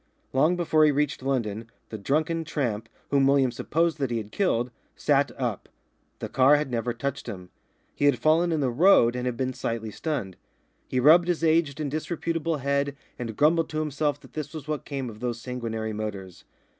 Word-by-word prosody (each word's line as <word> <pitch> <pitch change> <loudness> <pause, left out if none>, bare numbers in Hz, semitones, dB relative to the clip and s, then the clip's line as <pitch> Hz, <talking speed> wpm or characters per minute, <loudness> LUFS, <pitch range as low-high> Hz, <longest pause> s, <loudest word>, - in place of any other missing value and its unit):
Long 155 +7 +3
before 160 -3 +3
he 155 - +6
reached 145 -1 0
London, 115 -5 -2 0.2
the 110 - -5
drunken 155 +8 0
tramp, 125 -9 -2 0.2
whom 140 -1 +4
William 135 -2 +3
supposed 165 +6 0
that 135 -3 0
he 120 - -1
had 105 -2 -6
killed, 125 - 0 0.2
sat - - +2
up. - - -3 0.5
The - - -5
car 135 +3 +5
had 145 -3 -1
never 120 0 -1
touched 140 +3 -4
him. 90 -2 -8 0.4
He 145 - -1
had 140 -3 +4
fallen 165 +3 +3
in 160 -2 0
the 130 -3 +1
road 125 -5 +5
and 125 0 -2
had 120 -2 -2
been 130 0 -1
slightly 115 -3 -3
stunned. 105 - -4 0.5
He 130 - 0
rubbed 165 +6 +6
his 175 -2 0
aged 160 -3 +2
and 145 -3 -2
disreputable 165 +1 -2
head 140 +1 0 0.2
and 115 -3 -5
grumbled 160 +3 +3
to 155 - -2
himself 150 -1 -1
that - - -17
this 155 +1 -5
was 155 -1 -7
what 150 -1 -3
came 135 -3 -4
of 110 -2 -9
those 120 -1 -3
sanguinary 115 -3 -4
motors. 100 -4 -6
140 Hz, 195 wpm, -26 LUFS, 120-155 Hz, 0.5 s, he